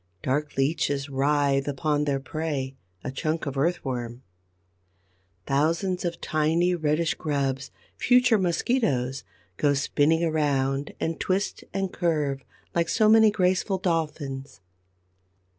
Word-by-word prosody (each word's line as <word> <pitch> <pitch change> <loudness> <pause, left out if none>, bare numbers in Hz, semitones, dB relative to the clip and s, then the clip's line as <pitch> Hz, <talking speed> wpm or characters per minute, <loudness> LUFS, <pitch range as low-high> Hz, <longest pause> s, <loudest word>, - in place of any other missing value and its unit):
Dark 145 +2 -1
Leeches 140 0 0
writhe 140 0 +1
upon 145 +1 0
their 140 -2 0
prey, 140 -2 -3 0.3
a 130 - -4
chunk 155 +4 -2
of 140 -1 -4
Earthworm; 130 -5 -2 1.2
thousands 165 +6 0
of 170 -1 -3
tiny, 160 +4 +1
reddish 155 -1 +1
grubs, 140 -3 -2 0.3
future 250 -3 +4
Mosquitoes, 165 - 0 0.3
go 145 -1 +2
spinning 150 +4 +2
around 145 -3 0
and 165 0 -2
twist 190 +2 -1
and 195 -1 -2
curve 150 -6 0 0.3
like 170 -1 +1
so 215 -2 +3
many 220 0 +7
graceful 190 -1 +1
Dolphins. 150 - -3
150 Hz, 110 wpm, -26 LUFS, 135-175 Hz, 1.2 s, many